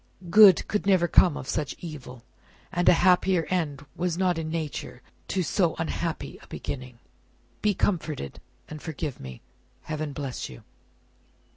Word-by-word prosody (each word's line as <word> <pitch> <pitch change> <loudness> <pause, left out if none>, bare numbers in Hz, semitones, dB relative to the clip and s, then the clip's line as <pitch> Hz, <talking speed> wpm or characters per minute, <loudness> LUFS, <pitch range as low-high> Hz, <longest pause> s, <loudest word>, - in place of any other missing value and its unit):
Good 205 -3 +8
could 210 -1 -1
never 185 -3 +4
come 170 -2 +5
of 130 - -7
such 150 -1 -2
evil, 130 -7 -9 0.5
a 175 +1 +5
happier 180 0 +4
end 145 -6 -1
was 175 -1 -1
not 180 -3 +1
in 160 -1 -4
nature 160 -2 -5 0.2
to 185 - 0
so 170 -1 +1
unhappy 165 0 -3
a - - -16
beginning. 125 -2 -6 0.6
Be 210 -2 +2
comforted, 155 - -2 0.3
and 155 -1 -8
forgive 150 -4 -5
me. 65 -2 -9 0.4
Heaven 155 -1 -4
bless 135 -2 -5
you!" 60 - -12
160 Hz, 140 wpm, -26 LUFS, 145-180 Hz, 0.6 s, Good